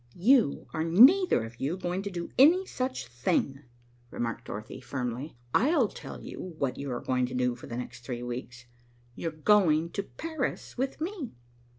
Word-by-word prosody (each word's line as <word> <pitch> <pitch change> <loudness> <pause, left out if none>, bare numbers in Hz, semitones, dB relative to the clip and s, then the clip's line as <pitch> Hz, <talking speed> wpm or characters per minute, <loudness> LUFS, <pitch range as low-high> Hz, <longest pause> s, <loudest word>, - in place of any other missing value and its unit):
"You 225 - +4
are 160 -1 0
neither 250 - +6
of 115 +2 -9
you 150 +7 -1
going 180 0 -2
to 200 - -4
do 175 -3 -5
any 345 +8 +7
such 255 - -3
thing," 120 +3 -1 0.5
remarked 115 -1 -4
Dorothy 110 +5 -7
firmly. 125 +1 -4 0.2
"I'll 270 - +4
tell - - -9
you 180 -3 -7
what 135 -4 -1
you 140 -1 -4
are 120 - -2
going 125 -1 0
to 130 - -6
do 125 -1 +1
for 120 - -11
the 120 - -5
next 120 0 -7
three 120 0 -5
weeks. 125 0 -6 0.5
You're 165 - -3
going 165 -1 +3
to 200 - -2
Paris 315 +7 -4
with 265 +3 -2
me." 335 - -4
155 Hz, 175 wpm, -29 LUFS, -, 0.5 s, any